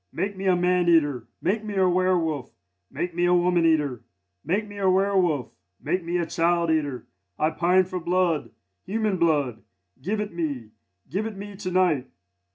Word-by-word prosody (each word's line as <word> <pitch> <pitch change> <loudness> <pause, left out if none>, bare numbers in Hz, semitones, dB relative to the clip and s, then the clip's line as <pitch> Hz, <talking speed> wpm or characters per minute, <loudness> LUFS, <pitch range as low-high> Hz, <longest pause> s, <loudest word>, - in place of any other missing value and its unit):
make 195 +4 -2
me 190 0 -3
a 185 - +5
man 180 0 +2
eater! 145 -8 +2 0.2
Make 210 +5 0
me 210 -1 -5
a 190 -1 +3
werwolf! 175 -6 0 0.3
make 175 -1 -4
me 175 +1 +1
a 175 0 +4
woman 175 -1 +3
eater! 145 -7 +1 0.4
Make 200 +7 -1
me 205 0 -9
a 190 -1 +3
werwolf! 185 - +2 0.3
make 185 -1 -1
me 170 +1 -1
a 170 - 0
child 170 0 +1
eater! 145 -6 -1 0.3
I 155 +1 +1
pine 180 +3 +3
for 185 0 -4
blood! 170 -6 0 0.3
human 215 -1 -1
blood! 145 -9 +1 0.4
Give 205 +9 -2
it 210 -2 -4
me! 140 -10 -4 0.4
give 195 +10 -2
it 215 -3 -8
me 200 +1 -8
to 195 -2 -4
night! 175 -8 +2
175 Hz, 175 wpm, -25 LUFS, 160-190 Hz, 0.4 s, a